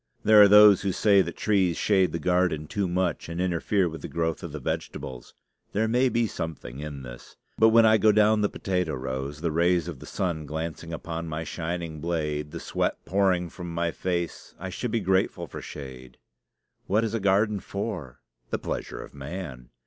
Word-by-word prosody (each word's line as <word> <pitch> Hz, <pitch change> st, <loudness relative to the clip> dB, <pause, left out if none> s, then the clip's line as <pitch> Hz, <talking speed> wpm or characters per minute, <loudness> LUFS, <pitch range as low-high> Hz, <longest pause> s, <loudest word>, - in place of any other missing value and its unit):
There 110 Hz, 0 st, +7 dB
are 100 Hz, -, +9 dB
those 105 Hz, -1 st, +8 dB
who 100 Hz, -, 0 dB
say 100 Hz, +1 st, +4 dB
that 85 Hz, -2 st, -4 dB
trees 95 Hz, -5 st, +2 dB
shade 95 Hz, -3 st, +3 dB
the -, -, -2 dB
garden 90 Hz, -2 st, +1 dB
too 100 Hz, +4 st, -2 dB
much 90 Hz, -2 st, -1 dB
and 85 Hz, +1 st, -5 dB
interfere 90 Hz, +2 st, +1 dB
with 80 Hz, -1 st, -7 dB
the -, -, -5 dB
growth 80 Hz, +1 st, -2 dB
of 85 Hz, -4 st, -6 dB
the 75 Hz, -, -6 dB
vegetables. 65 Hz, -1 st, -5 dB, 0.4 s
There 110 Hz, +2 st, +1 dB
may 125 Hz, +3 st, +3 dB
be 120 Hz, -1 st, +1 dB
something 80 Hz, -, -6 dB
in 75 Hz, -2 st, -6 dB
this; -, -, -11 dB, 0.2 s
but 110 Hz, -, +7 dB
when 115 Hz, 0 st, +6 dB
I 110 Hz, 0 st, +5 dB
go 110 Hz, +2 st, +5 dB
down 105 Hz, +1 st, +4 dB
the 105 Hz, -, +2 dB
potato 90 Hz, -5 st, -2 dB
rows, 65 Hz, +3 st, -4 dB
the 85 Hz, -1 st, 0 dB
rays 85 Hz, +2 st, +2 dB
of 80 Hz, -7 st, -6 dB
the -, -, -11 dB
sun 80 Hz, -5 st, -2 dB
glancing 80 Hz, +2 st, -5 dB
upon 85 Hz, 0 st, -5 dB
my 80 Hz, 0 st, -4 dB
shining 85 Hz, -2 st, -4 dB
blade, 75 Hz, -3 st, -2 dB
the -, -, -7 dB
sweat -, -, -1 dB
pouring 95 Hz, -2 st, +2 dB
from 85 Hz, +1 st, -8 dB
my 85 Hz, 0 st, -1 dB
face, 85 Hz, 0 st, -3 dB
I 95 Hz, +2 st, -5 dB
should 120 Hz, +7 st, -3 dB
be 115 Hz, 0 st, 0 dB
grateful 95 Hz, 0 st, +1 dB
for -, -, -8 dB
shade. 65 Hz, -3 st, -9 dB, 0.7 s
What 105 Hz, +4 st, +2 dB
is 115 Hz, -, -2 dB
a 115 Hz, -, 0 dB
garden 100 Hz, +1 st, +2 dB
for? 95 Hz, -, -5 dB, 0.3 s
The -, -, -1 dB
pleasure -, -, -5 dB
of -, -, -14 dB
man. 70 Hz, -3 st, -7 dB
85 Hz, 195 wpm, -26 LUFS, 80-100 Hz, 0.7 s, are